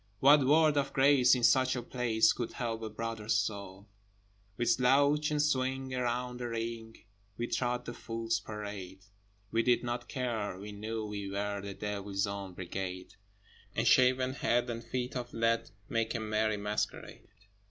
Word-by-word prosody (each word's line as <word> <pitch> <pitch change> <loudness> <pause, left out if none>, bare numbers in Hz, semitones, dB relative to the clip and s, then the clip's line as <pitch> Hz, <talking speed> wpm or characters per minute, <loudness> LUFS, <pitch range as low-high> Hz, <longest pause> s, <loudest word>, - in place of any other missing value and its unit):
What 140 +1 +6
word 155 0 +5
of 140 -1 0
grace 135 -2 +5
in 125 - -2
such 130 +1 +4
a 120 - -3
place 115 -3 +2
Could 120 - -4
help 115 -2 -3
a 110 - -4
brother's 110 0 -2
soul? 100 -1 -4 0.7
With 120 - -1
slouch 140 +4 +3
and 150 -1 0
swing 130 -2 0
around 125 0 -2
the 120 - -3
ring 115 -1 -5 0.4
We 120 - -1
trod 120 +1 -1
the 120 - -5
Fool's 115 -1 -2
Parade! 100 -3 -7 0.5
We 115 - +3
did 125 +1 +2
not 120 0 -4
care: 115 -7 -2
we 105 +2 -8
knew 110 +2 -4
we 100 -2 -5
were 100 0 -2
The 100 0 -7
Devil's 100 -1 -2
Own 100 -2 -6
Brigade: 90 0 -5 0.6
And - - 0
shaven 130 0 +4
head 120 -2 +1
and 115 0 -5
feet 125 +2 -3
of 125 -1 -5
lead 115 0 +1 0.2
Make 115 +1 -1
a - - 0
merry 110 0 0
masquerade. 105 +1 -4
115 Hz, 165 wpm, -31 LUFS, 105-125 Hz, 0.7 s, What